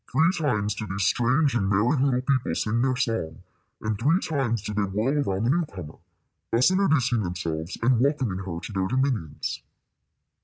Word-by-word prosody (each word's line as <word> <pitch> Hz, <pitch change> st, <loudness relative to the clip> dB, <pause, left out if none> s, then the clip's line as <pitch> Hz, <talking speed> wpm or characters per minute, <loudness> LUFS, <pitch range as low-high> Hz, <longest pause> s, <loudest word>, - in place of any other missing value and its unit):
Three 165 Hz, +3 st, +4 dB
times 110 Hz, -, 0 dB
did 105 Hz, -1 st, -6 dB
these 95 Hz, +1 st, -2 dB
strange 130 Hz, -, +2 dB
and 100 Hz, -5 st, 0 dB
merry 105 Hz, +8 st, +2 dB
little 130 Hz, -2 st, +1 dB
people 130 Hz, -1 st, 0 dB
sing 115 Hz, +2 st, 0 dB
their 130 Hz, 0 st, +1 dB
song, 115 Hz, -, -2 dB, 0.4 s
and 110 Hz, -1 st, -2 dB
three 150 Hz, +9 st, +3 dB
times 125 Hz, -, -1 dB
did 105 Hz, 0 st, -4 dB
they -, -, +3 dB
whirl 110 Hz, +9 st, 0 dB
around 95 Hz, +2 st, -1 dB
the 120 Hz, -, +2 dB
new 170 Hz, +2 st, +1 dB
comer, 85 Hz, -, -10 dB, 0.5 s
thus 120 Hz, +9 st, +4 dB
introducing 145 Hz, -, +2 dB
themselves 85 Hz, -2 st, -4 dB
and 120 Hz, 0 st, +3 dB
welcoming 130 Hz, -8 st, 0 dB
her 90 Hz, -3 st, -5 dB
to 110 Hz, -, -8 dB
their 95 Hz, -1 st, 0 dB
dominions. 125 Hz, -, -2 dB
115 Hz, 180 wpm, -25 LUFS, 95-135 Hz, 0.5 s, Three